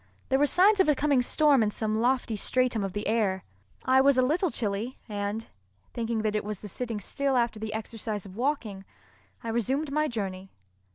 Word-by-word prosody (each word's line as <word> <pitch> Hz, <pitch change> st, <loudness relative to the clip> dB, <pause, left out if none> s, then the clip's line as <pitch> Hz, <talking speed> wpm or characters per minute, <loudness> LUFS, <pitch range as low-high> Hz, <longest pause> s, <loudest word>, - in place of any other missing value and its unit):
There 265 Hz, -, +3 dB
were 290 Hz, -, +4 dB
signs 395 Hz, +6 st, +4 dB
of 375 Hz, -, +4 dB
a 300 Hz, -, +4 dB
coming 280 Hz, -2 st, +2 dB
storm 285 Hz, +1 st, +3 dB
in 215 Hz, -, +2 dB
some 215 Hz, +1 st, -1 dB
lofty 245 Hz, -2 st, +1 dB
stratum 245 Hz, 0 st, 0 dB
of 195 Hz, -2 st, -3 dB
the 205 Hz, 0 st, -4 dB
air. 205 Hz, -4 st, 0 dB, 0.4 s
I 260 Hz, +1 st, +5 dB
was 275 Hz, -1 st, +4 dB
a 255 Hz, -, +5 dB
little 330 Hz, +8 st, +1 dB
chilly, 220 Hz, 0 st, -3 dB
and, 205 Hz, +1 st, -3 dB, 0.5 s
thinking 230 Hz, -2 st, -2 dB
that 215 Hz, -1 st, 0 dB
it 210 Hz, -, 0 dB
was 210 Hz, -1 st, -5 dB
the 210 Hz, -, -7 dB
sitting 230 Hz, +2 st, -4 dB
still 270 Hz, +6 st, -1 dB
after 235 Hz, -2 st, 0 dB
the 220 Hz, 0 st, -4 dB
exercise 220 Hz, -2 st, -5 dB
of 190 Hz, -1 st, -11 dB
walking, 230 Hz, -6 st, -2 dB, 0.6 s
I 230 Hz, -, -4 dB
resumed 265 Hz, +6 st, -1 dB
my 305 Hz, +1 st, +1 dB
journey. 195 Hz, -6 st, -4 dB
230 Hz, 195 wpm, -28 LUFS, 210-265 Hz, 0.6 s, I